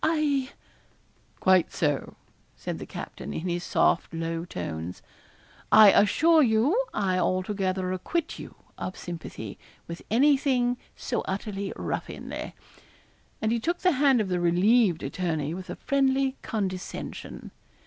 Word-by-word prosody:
I 295 -4 +1 0.4
' - - -36
'Quite 185 -2 +4
so,' 145 -4 -1 0.4
said - - -5
the - - -7
captain, - - -7
in 165 - -3
his 175 0 -2
soft 170 - +2
low 165 0 -3
tones. 85 - -6 0.7
'I 215 -2 +9
assure 315 +12 +5
you 270 - +3
I 185 -3 0
altogether 185 0 0
acquit 325 - -3
you - - -9 0.2
of 185 - -5
sympathy 160 - -7 0.3
with 170 0 -7
any 275 +6 +5
thing 250 -3 +1 0.2
so - - -2
utterly 195 0 -3
ruffianly,' - - -5 0.9
and 220 - +2
he 235 - +1
took 345 +9 -1
the 365 - +4
hand 275 -3 +4
of 205 -3 -1
the 180 -1 0
relieved 180 +2 +3
attorney 160 -4 -2
with 185 +1 -7
a - - -4
friendly 270 -1 +1
condescension. 190 -4 -5
195 Hz, 135 wpm, -27 LUFS, 175-265 Hz, 0.9 s, I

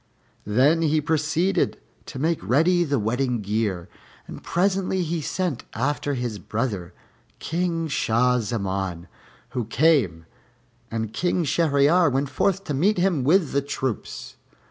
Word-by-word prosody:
Then 135 +10 +3
he 155 -1 +2
proceeded 160 +4 0 0.3
to 135 - -7
make 160 +4 0
ready 165 - +3
the 145 -4 0
wedding 120 +2 -1
gear, 100 -4 -2 0.4
and - - -9
presently 190 0 0
he 165 0 -2
sent 170 -2 -2
after 145 +3 -1
his 120 -4 -3
brother, 100 -7 -3 0.4
King 165 -1 -2
Shah 125 -2 +2
Zaman, 95 -5 -3 0.4
who 125 -4 -3
came, 115 - +2 0.6
and 110 -1 -3
King 175 +7 0
Shahryar 155 +2 +3
went 135 +1 0
forth 195 +8 0
to 150 - -4
meet 185 +10 +2
him 175 -6 +1
with 160 +2 +3
the 140 - +1
troops. 135 -4 -5
140 Hz, 130 wpm, -24 LUFS, 115-165 Hz, 0.6 s, Then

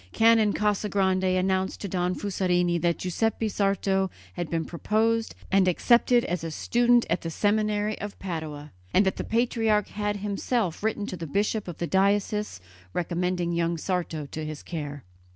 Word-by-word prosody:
Canon 225 -2 +5
Casagrande 190 -3 +1
announced 190 0 0
to 200 - -3
Don 180 0 -1
Fusarini 180 -3 +1
that 170 -1 +1
Giuseppe 220 +5 -1
Sarto 195 -2 +1 0.2
had 175 -2 -4
been 165 -1 -1
proposed 225 +6 0 0.2
and 190 -1 +4
accepted 240 +6 +4
as 175 -1 -2
a 165 - -3
student 240 +8 +3
at 170 +2 0
the 165 - -4
seminary 210 +3 0
of 205 0 -6
Padua, 155 -5 -5 0.2
and 195 - +5
that 190 - 0
the - - -2
patriarch 225 -3 +1
had 205 0 -2
himself 205 -1 -1
written 210 -1 -1
to 185 - -5
the 165 -1 -6
bishop 205 +6 0
of 175 - -6
the 175 - -2
diocese 200 - +1 0.3
recommending 175 0 -1
young 170 0 0
Sarto 165 -3 -2
to 155 - -4
his 155 -1 -6
care. 145 -5 -6
190 Hz, 160 wpm, -26 LUFS, 175-210 Hz, 0.3 s, Canon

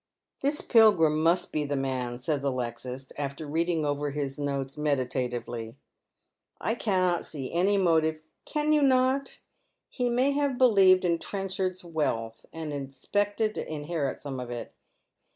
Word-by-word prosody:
" - - -62
This 285 +2 0
Pilgiim 180 - +5
must 170 +3 +2
be 150 - 0
the 145 0 -2
man," 130 -3 -2
says 140 +2 -2
Alexis, 130 0 -4
after 140 +2 -4
reading 165 +1 0
over 145 0 -1
his 140 -1 -3
notes 140 -2 -2
meditatively. 125 -5 -2 0.4
" - - -41
I 225 - 0
cannot 185 -6 +1
see 135 -4 -6
any 190 +4 +3
motive 160 -4 +2
" - - -49
" - - -52
Can 305 0 +2
you 300 - +4
not? 265 0 +2 0.5
He 245 -2 -1
may 255 +4 +2
have 280 -2 0
believed 195 -7 +6
in 170 -1 +2
Trenchard's 190 -2 -3
wealth, 115 -9 -2
and 160 -2 -5
expected 205 +11 -1
to - - -5
inherit 150 -2 -2
some 135 -3 -5
of 125 -1 -6
it. 120 -1 -6
155 Hz, 155 wpm, -28 LUFS, 135-200 Hz, 0.5 s, believed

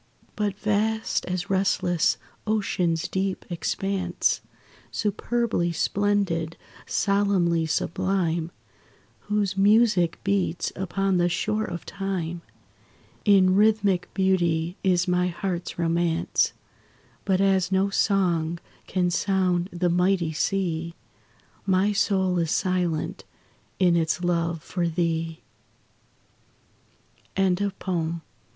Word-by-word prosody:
But 205 -2 -1
vast 215 +1 0
as 180 +2 -3
restless 185 -3 +2 0.3
ocean's 180 -5 0
deep 190 0 -2
expanse, 185 +1 -1 0.5
Superbly 215 -3 -1
splendid, 185 -2 0 0.3
solemnly 195 -5 +2
sublime, 170 -1 0 0.8
Whose 205 -2 0
music 200 -3 +4
beats 195 -3 0
upon 190 +1 0
the 175 0 +3
shore 215 +5 -1
of 175 -1 -6
time 185 -4 -3 0.8
In 190 -3 +5
rhythmic 205 -3 +2
beauty, 175 -3 +1
is 180 -1 +2
my 180 0 +2
heart's 180 0 -4
romance: 170 0 +1 0.7
But 190 -2 +1
as 190 -2 +2
no 190 +1 +2
song 175 -5 +1 0.3
can 180 -1 0
sound 185 -1 +1
the 175 +1 0
mighty 180 -1 +2
sea, 170 -1 -1 0.7
My 190 +2 +3
soul 190 -3 +1
is 165 -2 0
silent 180 -3 -1 0.5
in 180 -2 +4
its 165 +1 0
love 170 -2 0
for 175 -2 -2
thee. 165 -1 -1 2.0
LILIES 190 -2 +2
AND 200 -1 0
POPPIES. 170 -3 -2
185 Hz, 100 wpm, -25 LUFS, 170-195 Hz, 2.0 s, In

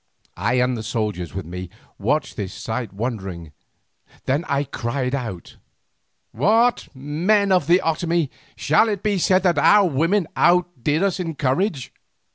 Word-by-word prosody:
I 105 +7 0
and 125 0 +2
the 115 - -5
soldiers 105 -7 -3
with 95 -3 -4
me 90 +2 -7 0.3
watched 135 +7 -1
this 100 -4 -5
sight 115 -1 -4
wondering, 95 - -5 0.7
then 145 +6 0
I 140 0 0
cried 125 -1 -3
out: 110 -11 -5 0.7
"What! 225 - +2
men 175 +9 +1
of 185 -1 +3
the 175 +2 +4
Otomie, 165 -2 0 0.2
shall 155 +10 +3
it 205 -2 -3
be 205 -3 +1
said 185 +1 +3
that 175 -3 +3
our 205 -2 +5
women 165 +6 +1
outdid 175 -3 +2
us 195 -2 0
in 165 -3 -3
courage?" 140 - -1
140 Hz, 145 wpm, -22 LUFS, 115-180 Hz, 0.7 s, our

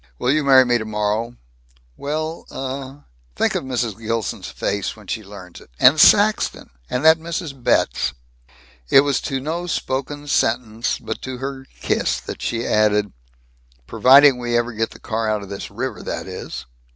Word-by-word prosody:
"Will 125 - +1
you 155 +1 +2
marry 135 -2 +6
me, 120 -1 +2
tomorrow?" 110 +2 -2 0.6
"Well, 155 +3 -4
uh 135 +1 -6 0.2
" - - -36
"Think - - +1
of - - -2
Mrs. 120 -5 -3
Gilson's 115 -1 -3
face 100 -1 -3
when 110 -1 -15
she 110 +3 -4
learns 95 -3 -12
it! - - -18
And 135 +5 +6
Saxton, 210 +6 +4 0.2
and 125 +5 -2
that 160 0 +7
Mrs. 165 -2 -5
Betz!" - - +1 0.8
It 135 - +7
was 140 -1 0
to 135 -3 -2
no 165 +6 -4
spoken 145 -2 -3
sentence 115 -3 0
but - - -6
to 130 -1 -6
her 135 0 -6
kiss - - 0
that - - -8
she 115 0 -2
added, 105 -1 +2 0.7
"Providing 135 - +6
we 120 -1 0
ever 120 0 -1
get 115 +1 -1
the - - -14
car 110 0 -2
out 105 -1 -1
of 100 - -11
this 100 - -6
river, - - -5
that - - -5
is!" - - -7
125 Hz, 170 wpm, -21 LUFS, 110-140 Hz, 0.8 s, that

